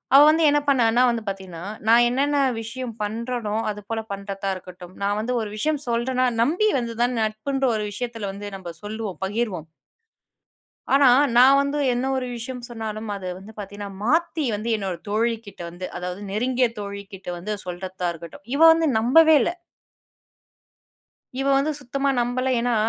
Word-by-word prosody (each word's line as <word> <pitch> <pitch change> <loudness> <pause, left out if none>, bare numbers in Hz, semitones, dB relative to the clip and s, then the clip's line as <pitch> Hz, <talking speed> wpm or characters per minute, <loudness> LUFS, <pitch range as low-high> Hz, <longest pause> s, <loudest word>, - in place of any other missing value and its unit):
அவ 280 - +10
வந்து 320 +1 +3
என்ன 295 0 +3
பண்ணான்னா? 240 -2 +4
வந்து 235 -1 -1
பார்த்தீங்கன்னா, 190 -3 -6 0.2
நான் 235 +1 +6
என்னென்ன 285 +3 +1 0.2
விஷயம் 235 0 -6
பண்றனோ 225 0 -3 0.2
அதுபோல 210 +2 -5
பண்றதா 195 0 -4
இருக்கட்டும், 180 0 -11
நான் 205 +1 +1
வந்து 250 +3 -2
ஒரு 215 - -4
விஷயம் 300 +4 0
சொல்றேனா, 255 +2 +1 0.2
நம்பி 350 - +2
வந்துதான் 240 +1 -1
நட்புன்ற 240 +6 -1
ஒரு 210 - -2
விஷயத்துல 225 -3 -4
வந்து 205 +1 -7
நம்ம 175 -3 -8
சொல்லுவோம், 215 -2 -5
பகிர்வோம். 195 -6 -2 1.3
ஆனா, 275 -2 +6 0.3
நான் 265 +3 +7
வந்து 280 +1 -1 0.2
என்ன 250 +2 -1
ஒரு 255 -1 -2
விஷயம் 245 +1 -6
சொன்னாலும் 220 -2 -5
அது 190 -2 -7
வந்து 205 +3 -12
பாத்தீங்கன்னா, 205 0 -7
மாத்தி 320 +2 +1
வந்து 215 +3 -4
என்னோட 190 -4 -3
தோழி 230 +2 +1
கிட்ட 200 - -12
வந்து, 180 +2 -6
அதாவது 180 +2 -5
நெருங்கிய 250 +3 +1
தோழிகிட்ட 200 -2 -8
வந்து, 210 +5 -4
சொல்றதா 180 0 -4
இருக்கட்டும். 170 +3 -11
இவ 295 - -1
வந்து 325 0 +2
நம்பவே 315 +8 +6
இல்ல. - - 0 1.9
இவ 270 - -1
வந்து 295 +3 +1
சுத்தமா 275 +2 -2
நம்பல, 250 +2 0
ஏன்னா 240 0 +1
225 Hz, 150 wpm, -23 LUFS, 200-255 Hz, 1.9 s, அவ